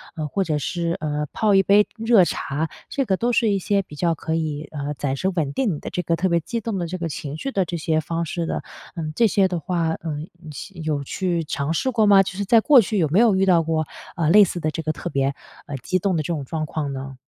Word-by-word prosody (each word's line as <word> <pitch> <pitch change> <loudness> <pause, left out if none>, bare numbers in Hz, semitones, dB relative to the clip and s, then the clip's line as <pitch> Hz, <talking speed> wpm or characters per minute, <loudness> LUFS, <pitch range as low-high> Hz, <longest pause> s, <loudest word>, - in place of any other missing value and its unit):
呃， 155 -2 -3
或 195 +6 0
者 155 -3 0
是， 170 +3 -2
呃， 150 -1 -1
泡 210 -3 +2
一 195 - +5
杯 205 +2 +5
热 225 -4 +5
茶， 155 0 -2 0.2
这 275 -2 -1
个 190 -3 +1
都 240 +1 +1
是 230 -2 +2
一 200 - +2
些 200 +1 +1
比 150 - -12
较 170 +2 +1
可 160 +1 -3
以， 155 -2 -3
呃， 145 -1 -4
暂时 140 +7 -1
稳 155 -6 -1
定 225 - 0
你 - - -7
的 - - -6
这 180 - -2
个 165 0 +1
特 180 +3 0
别 170 - +3
激 230 +8 -3
动 215 -2 -3
的 175 - -2
这 185 - -4
个 170 -2 -3
情 150 -1 -5
绪 275 - -4
的 195 -6 +1
这 170 +1 -4
些 160 0 0
方 165 +2 -2
式 170 +1 -3
的。 - - -3 0.3
嗯， 155 -3 -3
这 235 - +4
些 195 -1 +3
的 180 -2 -2
话， 165 +1 -1
呃， 155 -3 -5 0.3
吸 170 +5 -9
有 150 -2 -1
去 170 +3 -1
尝 150 +2 -2
试 260 - 0
过 225 -3 +3
吗？ 200 -1 +7
就 185 - -5
是 200 - -2
在 225 +4 +6
过 280 -1 +7
去 215 +1 -2
有 160 - +3
没 175 +7 +3
有 230 -4 +5
遇 190 +1 +3
到 175 -3 +4
过， 160 -1 -1 0.3
呃， 165 -4 +1
类 205 +3 +8
似 175 -1 -2
的 155 - -1
这 160 - -4
个 155 - 0
特 150 - -5
别， 135 0 0 0.3
呃， 145 - -5
激 185 +8 -1
动 190 0 0
的 - - +1
这 - - -5
种 145 -4 -4
状 155 +3 -3
况 145 -2 -3
呢？ 135 0 -7
170 Hz, 295 characters per minute, -23 LUFS, 155-195 Hz, 0.3 s, 类